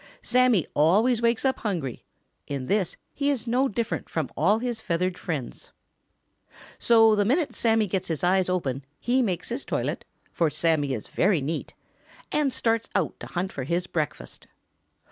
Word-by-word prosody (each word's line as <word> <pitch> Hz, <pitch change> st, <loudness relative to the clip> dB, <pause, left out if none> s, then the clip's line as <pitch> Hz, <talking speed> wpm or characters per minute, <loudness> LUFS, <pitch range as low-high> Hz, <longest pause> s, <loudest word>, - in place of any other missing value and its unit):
Sammy 245 Hz, -, +3 dB
always 215 Hz, -, +3 dB
wakes 235 Hz, +2 st, +1 dB
up 265 Hz, -, +1 dB
hungry. 170 Hz, -, -3 dB, 0.4 s
In 140 Hz, -2 st, -4 dB
this 195 Hz, +2 st, 0 dB, 0.2 s
he 285 Hz, 0 st, 0 dB
is 265 Hz, -5 st, -1 dB
no 250 Hz, +3 st, +2 dB
different 230 Hz, -1 st, -3 dB
from 155 Hz, -5 st, -2 dB
all 190 Hz, +9 st, +3 dB
his 240 Hz, -1 st, -3 dB
feathered 180 Hz, -1 st, -1 dB
neighbors. 145 Hz, -8 st, -4 dB, 1.1 s
So 225 Hz, -2 st, +6 dB
the 205 Hz, -1 st, +3 dB
minute 285 Hz, -, +1 dB
Sammy 225 Hz, -2 st, +2 dB
gets 190 Hz, -1 st, -2 dB
his 160 Hz, -1 st, -3 dB
eyes 185 Hz, +1 st, +3 dB
open 140 Hz, -7 st, -1 dB, 0.2 s
he 255 Hz, +2 st, +2 dB
makes 190 Hz, -8 st, -2 dB
his 240 Hz, +4 st, -3 dB
toilet, -, -, -2 dB, 0.3 s
for 165 Hz, -2 st, +1 dB
Sammy 150 Hz, -4 st, +1 dB
is 110 Hz, -, -7 dB
very 190 Hz, -2 st, +2 dB
neat, 150 Hz, +4 st, -4 dB, 0.6 s
and 295 Hz, -3 st, +1 dB
starts 230 Hz, -2 st, 0 dB
out -, -, 0 dB
to -, -, -8 dB
hunt 185 Hz, +2 st, -3 dB
for 135 Hz, -, -5 dB
his 170 Hz, +6 st, -1 dB
breakfast. 155 Hz, -4 st, -4 dB
195 Hz, 165 wpm, -26 LUFS, 165-235 Hz, 1.1 s, So